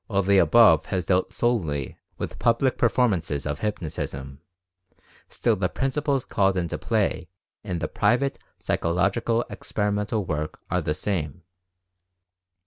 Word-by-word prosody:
While 100 -2 +1
the 100 +1 +4
above 115 0 +6
has 90 -2 -2
dealt 90 +1 +1
solely 80 - -1 0.2
with - - -5
public 120 +3 +2
per 120 - +4
formances 85 - 0
of 75 0 -3
hypnotism, 70 -9 -4 0.9
still 115 - +1
the 90 -2 -1
principles 135 +1 -1
called 95 -2 +1
into 85 -2 -2
play 80 - 0 0.4
in 90 -5 -3
the - - -2
private 135 +3 +1 0.2
psychological 100 +7 0
experimental 105 0 -2
work 75 -2 -3
are 90 +1 +1
the 75 -2 -1
same. 85 -3 -3
95 Hz, 130 wpm, -25 LUFS, 85-115 Hz, 0.9 s, above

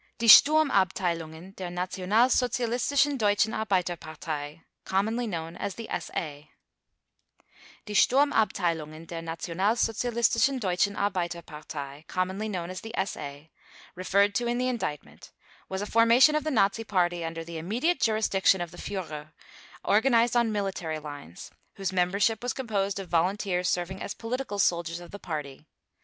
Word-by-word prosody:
DIE 235 - -2
STURMABTEILUNGEN 185 - +4
DER 185 -2 -5
NATIONALSOZIALISTISCHEN 240 +9 +1
DEUTSCHEN 210 -1 +2
ARBEITERPARTEI 165 -6 -3 0.2
(COMMONLY 220 +5 0
KNOWN 165 -4 -5
AS 195 - -4
THE 230 - -7
SA) 145 -2 -6 1.4
"Die 210 - -6
Sturmabteilungen 175 - +2
der 165 0 -6
Nationalsozialistischen 225 - 0
Deutschen 195 -1 0
Arbeiterpartei 160 -6 -4
(commonly 190 +5 -2
known 180 -3 -4
as 185 -2 -6
the 225 +1 -8
SA)" 145 -4 -8 0.5
referred 200 +3 +2
to 240 +2 0
in 240 0 0
the 250 +1 0
Indictment 220 - -5 0.4
was 190 +1 -3
a - - -3
formation 230 +7 +5
of 305 -1 0
the 310 - -1
Nazi 225 -4 +2
Party 175 -5 0
under 165 0 -4
the 165 0 -7
immediate 240 - 0
jurisdiction 215 -4 +2
of 175 -1 -4
the 175 - -12
Führer, 155 -6 -6 0.5
organized 235 +2 +3
on 235 -2 +3
military 190 -6 -2
lines, 145 - -9 0.2
whose 195 -1 -3
membership 200 +5 +1
was 245 0 -2
composed 200 -6 -2
of 195 - -6
volunteers 180 +1 0
serving 180 +2 -2
as - - -5
political 240 -2 -4
soldiers 170 -3 +1
of 175 -1 -12
the 205 - -8
Party. 150 -3 -6
190 Hz, 135 wpm, -27 LUFS, 170-225 Hz, 1.4 s, formation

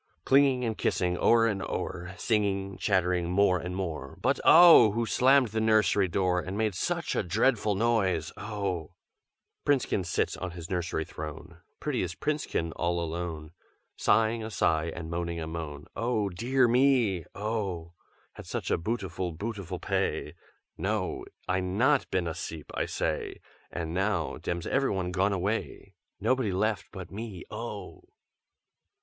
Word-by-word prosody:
Clinging 135 -2 +4
and 110 -1 -1
kissing 90 -1 +1
o'er 115 +5 +4
and 100 -4 0
o'er, 90 0 -4
Singing, 100 -3 0
chattering, 90 -3 +1
more 90 0 +3
and 90 +1 -5
more, 80 -8 -4
But - - +1
oh! 165 - +8
who 115 +1 0
slammed 130 +1 +4
the 110 +1 -1
nursery 110 -3 +3
door, 90 0 +1
And 90 +2 -5
made 110 -2 +1
such 90 - -2
a - - +2
dreadful 105 +2 +1
noise, 95 -7 +1
oh! 100 -6 -4 0.7
"Princekin 135 -9 +1
sits 85 - -1
on 90 - -4
his 85 +1 -8
nursery 85 -3 -1
throne, 80 +3 -8 0.2
Prettiest 105 - -2
Princekin, 145 - -1
all 85 0 0
alone. 80 -2 -4 0.4
Sighing 110 +1 +2
a 110 - -4
sigh 80 -6 +1
and 80 0 -6
moaning 85 0 -2
a 80 - -3
moan, 80 -3 -6
'Oh 115 -3 0
dear 125 +7 +2
me, 120 -7 +3
oh! 100 -6 -3 0.4
Had - - -11
such - - -3
a - - +2
bootiful, 95 -4 -3
bootiful 100 -3 -5
p'ay! - - -1 0.5
No! - - -2 0.2
I 95 +1 +1
not 115 +10 +2
been 95 -2 0
as'eep, 80 -2 -6
I - - -1
say! - - -2 0.3
And 80 -1 -4
now 95 -3 0
dem's 85 -1 -3
everyone 95 -10 0
gone 95 +2 +2
away, 100 +4 -3 0.3
Nobody 130 -6 +1
left 105 +3 0
but 95 -2 -8
me, 105 -3 -6
oh!'" - - -7
95 Hz, 145 wpm, -28 LUFS, 85-110 Hz, 0.7 s, oh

